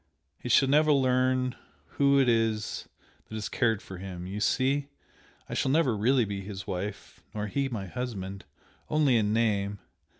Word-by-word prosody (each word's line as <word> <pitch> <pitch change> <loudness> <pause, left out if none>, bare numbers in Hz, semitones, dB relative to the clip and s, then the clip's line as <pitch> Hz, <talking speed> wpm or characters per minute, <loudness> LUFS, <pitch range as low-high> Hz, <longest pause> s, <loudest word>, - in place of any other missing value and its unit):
he 125 - -6
shall 135 - +5
never 150 +3 +4
learn 130 -2 +2 0.3
who 140 0 +3
it 135 - +3
is 115 -2 0 0.4
that 110 - -7
has 110 -1 -3
cared 115 -6 +1
for 95 -2 -9
him! 90 -2 -7
You 100 +3 -5
see? 135 +5 +1 0.6
I - - -7
shall - - 0
never 140 -3 +3
be 100 - -5
really 110 -5 +2
his 100 -1 -7
wife 95 +3 -5
nor 105 -1 -2
he 135 +6 -1
my 110 -6 -4
husband 100 -4 -5 0.4
only 150 -4 +3
in 105 -2 +2
name. 105 -3 +1
115 Hz, 165 wpm, -28 LUFS, 100-130 Hz, 0.6 s, shall